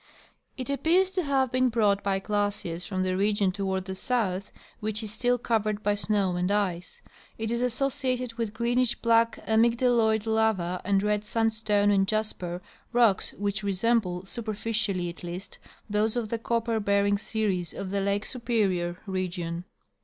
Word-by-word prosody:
It 260 +1 -3
appears 350 +6 +3
to 375 -1 0
have 270 -5 +1
been 255 0 +3
brought 210 -4 +2
by 195 -1 +1
glaciers 205 -4 -2
from 185 -2 -1
the 185 0 0
region 200 0 +2
toward 190 -1 -2
the 190 - -4
south 195 -2 -1 0.3
which 215 +1 -1
is 215 - -1
still 245 +3 +2
covered 215 -3 -1
by 205 - +2
snow 205 -3 0
and 180 +1 0
ice. 195 -4 -1 0.3
It 225 0 -3
is 235 0 0
associated 255 -1 0
with 230 -2 -3
greenish 240 +2 +1
black 230 0 +3
amygdaloid 230 -1 +3
lava 220 -5 +1
and 195 0 +2
red 210 0 +1
sandstone 215 -2 +1
and 195 -1 +3
jasper, 185 -5 -2 0.3
rocks 235 -5 +3
which 205 0 -2
resemble, 200 -2 0
superficially 215 -3 -2
at 170 +1 -8
least, 180 +2 -7 0.3
those 215 +1 +1
of 235 -3 -2
the 230 - -2
copper 230 0 0
bearing 200 0 +2
series 200 -7 -1
of 190 -1 -6
the 200 0 0
lake 200 +1 0
Superior 195 -8 0
region. 180 -3 -3
210 Hz, 155 wpm, -27 LUFS, 195-230 Hz, 0.3 s, appears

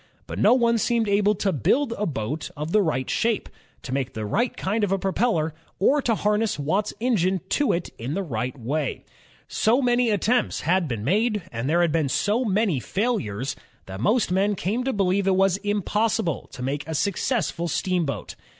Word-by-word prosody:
But - - -6
no - - +6
one 235 -2 +3
seemed 230 0 +1
able 205 +1 +3
to 195 0 0
build 230 - +1
a 210 - -2
boat 140 +2 -3
of 150 +2 -4
the 215 - +4
right 140 -8 -1
shape, 230 -2 0 0.4
to 130 - -5
make 135 -2 -2
the 110 -1 -3
right 235 - 0
kind 210 +3 -1
of 200 - +1
a 195 - +2
propeller, 190 -4 0 0.2
or 280 +9 +3
to 230 -4 +1
harness 210 +1 +1
Watt's 190 +9 0
engine 195 -6 +1
to 290 - +2
it 170 0 -2
in 125 +7 -3
the 195 - -1
right 125 -3 -4
way. 140 +4 -2 0.4
So 230 +4 +2
many 245 -2 +2
attempts 220 +4 +1
had 180 +1 +1
been 115 -6 -4
made, 210 - +1
and 115 +4 -3
there 170 +2 +3
had 170 -2 +2
been 155 -3 +1
so 215 - +1
many 200 - +1
failures, 135 - -2 0.3
that 95 +1 -7
most 215 - +2
men 200 +3 +2
came 210 +7 -1
to 265 - +1
believe 195 -2 +1
it 190 - +4
was 195 0 +3
impossible 205 -4 -1
to 125 -2 -7
make 140 +3 -2
a 160 - -3
successful 200 - -1
steam 180 +1 0
boat. 140 -8 -4
195 Hz, 195 wpm, -24 LUFS, 150-220 Hz, 0.4 s, no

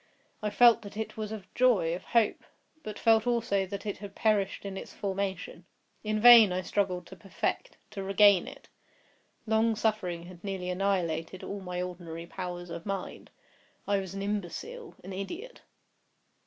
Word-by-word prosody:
I 210 - -1
felt 235 +2 +6
that 205 -1 -10
it 220 - -4
was 215 -1 -4
of 215 -4 -6
joy—of 190 -9 +2
hope; 230 -3 +2 0.4
but 215 -5 -7
felt 225 0 +4
also 225 -5 +1
that 200 +2 -6
it 205 -3 -4
had 200 -1 -9
perished 205 -3 +1
in 195 -1 -5
its - - -7
formation. 195 -3 -4 0.4
In 215 0 0
vain 230 -3 +9
I 185 +1 -1
struggled 180 -3 -1
to 190 - -11
perfect—to 195 - -4
regain 195 -1 +5
it. - - -11 0.8
Long 220 0 +2
suffering 210 -6 -1
had 175 0 -13
nearly 190 -2 -3
annihilated 180 -2 -1
all 200 - -5
my 180 -1 -3
ordinary 170 -2 -7
powers 175 -1 -6
of 170 - -6
mind. 195 -1 -5 0.6
I 200 0 +2
was 190 0 -6
an 195 - -4
imbecile—an 205 - -5
idiot. 345 - -7
195 Hz, 155 wpm, -29 LUFS, 180-215 Hz, 0.8 s, vain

